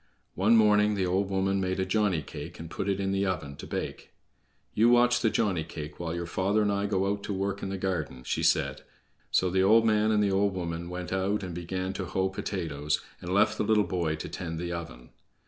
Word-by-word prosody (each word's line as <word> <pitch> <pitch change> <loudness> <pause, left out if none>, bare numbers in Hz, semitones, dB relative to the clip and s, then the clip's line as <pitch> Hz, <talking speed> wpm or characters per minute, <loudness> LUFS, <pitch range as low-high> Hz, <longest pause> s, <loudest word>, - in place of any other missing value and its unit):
One 105 +5 +4
morning 105 -1 +4
the 95 -2 0
old 95 +2 0
woman 95 0 +1
made 95 0 -1
a 95 - +1
Johnny 95 -5 +1
cake, - - -8
and 80 0 -8
put 100 - -3
it 100 0 0
in 95 0 0
the 100 0 +1
oven 80 -6 -3
to - - -8
bake. - - -5 0.6
"You 115 +3 +4
watch 120 0 +5
the 115 - +2
Johnny 95 -8 0
cake 75 -1 -8
while 85 -1 -3
your 85 0 -3
father 100 +5 +1
and 105 - +1
I 100 0 0
go 95 -2 +1
out 100 0 -3
to 100 - -3
work 100 +1 -2
in 95 - -3
the 95 - -3
garden," 75 -9 -3
she - - -2
said, - - +2 0.5
so 90 -1 +2
the 95 +1 +2
old 110 +4 +5
man 110 -1 +3
and 105 -1 +3
the 100 - +2
old 100 0 +2
woman 85 -1 -4
went 90 0 -5
out 100 +2 0
and 90 -2 -5
began 95 +2 -3
to 95 -1 -4
hoe 95 +2 0
potatoes, 80 -7 -2 0.2
and 90 - -5
left 110 +3 +3
the - - +2
little 105 0 +3
boy 85 -4 -1
to 80 - -6
tend 80 -3 -5
the 85 +1 -4
oven. 70 -8 -8
95 Hz, 235 wpm, -28 LUFS, 85-100 Hz, 0.6 s, watch